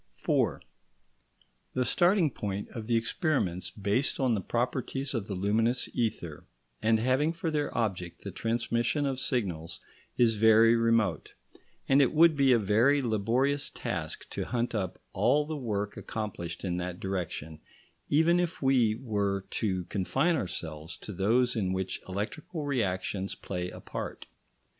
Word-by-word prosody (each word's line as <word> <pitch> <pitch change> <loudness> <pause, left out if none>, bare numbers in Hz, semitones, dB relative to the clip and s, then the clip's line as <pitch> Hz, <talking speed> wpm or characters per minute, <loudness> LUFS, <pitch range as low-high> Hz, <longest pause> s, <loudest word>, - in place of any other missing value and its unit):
§ - - -43 0.2
4 - - +1 1.2
The 130 -1 +1
starting 175 - +3
point 100 -3 -4
of 110 -2 -7
the 120 - +2
experiments 115 - 0
based 105 +7 0
on 130 -3 +2
the 105 - 0
properties 130 +5 -2
of 110 -5 -2
the 100 - -3
luminous 110 +6 +1
ether, 90 -9 -3 0.3
and 110 +1 +4
having 130 +7 +2
for 165 -1 -3
their 150 -2 -1
object 90 -7 -2
the 100 - -5
transmission 115 - 0
of 135 -2 -1
signals, 90 -12 -2 0.4
is 115 -3 +4
very 110 +1 +6
remote; 115 -7 +1 0.5
and 135 +1 +5
it 130 - +3
would 165 0 +6
be 135 -2 +4
a 120 - +6
very 115 +7 +3
laborious 120 +6 +1
task - - -4
to - - -3
hunt 120 0 -1
up 95 -5 -2 0.2
all 150 +1 +3
the 155 +1 -4
work 105 -7 -3
accomplished 95 -6 -5
in 90 -1 -1
that 90 0 -4
direction, 85 -5 -4 0.5
even 160 +4 +4
if 175 0 -1
we 125 -5 +3
were 100 -5 -1
to 95 -5 -1
confine 135 - +1
ourselves 80 - -5
to 105 - -8
those 120 +7 +2
in 95 -4 0
which 95 0 -3
electrical 145 - -4
reactions 100 -7 -1
play 90 -2 -4
a - - -10
part. - - -6
115 Hz, 150 wpm, -29 LUFS, 95-135 Hz, 1.2 s, very